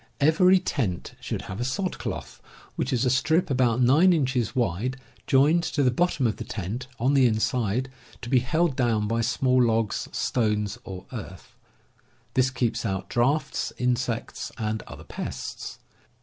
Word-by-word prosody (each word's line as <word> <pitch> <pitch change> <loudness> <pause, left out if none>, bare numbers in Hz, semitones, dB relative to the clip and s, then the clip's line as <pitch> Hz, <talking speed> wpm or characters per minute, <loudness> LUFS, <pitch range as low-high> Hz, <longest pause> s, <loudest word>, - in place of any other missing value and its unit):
Every 180 +6 +5
tent 120 - -2
should - - -4
have 95 - -7
a - - +1
sod 180 +9 -2
cloth, - - -6 0.3
which - - -2
is 125 0 +1
a - - +3
strip 160 +5 +2
about 125 -2 +2
nine 155 +9 +6
inches 130 -7 0
wide 120 +3 0 0.3
joined 145 +6 +4
to 145 - 0
the 125 - +4
bottom 150 0 +1
of 110 -3 0
the - - -5
tent 115 +1 -5
on 130 +4 +2
the 135 -3 +5
inside, 115 +2 0 0.4
to - - -5
be 130 - +5
held 155 +4 +1
down 115 -5 +1
by 115 +1 0
small 125 +2 +2
logs, 115 -3 +1
stones, 105 -2 0
or 95 -1 -8
earth. - - -8 0.8
This 130 0 +3
keeps 125 -3 -1
out 95 -4 -3
draughts, 140 +5 0
insects, 125 -2 -2
and 110 -1 -2
other - - -10
pests. - - -6
125 Hz, 160 wpm, -26 LUFS, 115-135 Hz, 0.8 s, nine